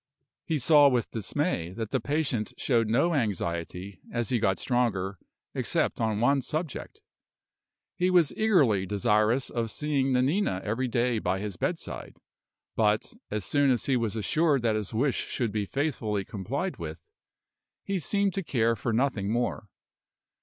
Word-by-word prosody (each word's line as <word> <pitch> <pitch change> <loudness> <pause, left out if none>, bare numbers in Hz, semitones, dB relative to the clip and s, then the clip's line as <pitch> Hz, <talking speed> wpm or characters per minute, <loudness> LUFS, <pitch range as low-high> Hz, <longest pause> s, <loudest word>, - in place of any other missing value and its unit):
He 160 - 0
saw 145 +1 +6
with 125 -4 0
dismay 110 - -2
that 110 +1 -5
the 130 - +1
patient 135 -5 -1
showed 115 -4 +2
no 145 +10 +2
anxiety, 95 - -2
as 120 -3 -1
he 125 - +1
got 95 -2 +1
stronger, 100 -7 0 0.3
except - - 0
on 110 -2 0
one 135 +4 +3
subject. 155 +2 -5 0.9
He 180 +1 +1
was 175 -5 +4
eagerly 140 - +3
desirous 105 +5 +2
of 115 -2 -1
seeing 140 0 0
Nanina 130 - +1
every 115 +5 -1
day 120 -1 +1
by 95 -1 0
his 100 -1 -4
bedside; - - -4 0.6
but, 105 -1 +1 0.2
as 105 -2 -2
soon 145 -1 +3
as 125 -3 +1
he 135 - +2
was 115 -3 0
assured 140 - +2
that 110 -2 +2
his 105 -3 -3
wish 125 +4 +1
should 120 -4 -1
be 105 -1 -2
faithfully 110 -9 -1
complied 125 - -3
with, 80 0 -6 0.8
he 195 -1 -1
seemed 200 +3 +1
to 195 - -1
care 115 -6 +1
for 115 +2 -2
nothing 115 -4 0
more. 120 -2 -1
120 Hz, 155 wpm, -28 LUFS, 105-140 Hz, 0.9 s, saw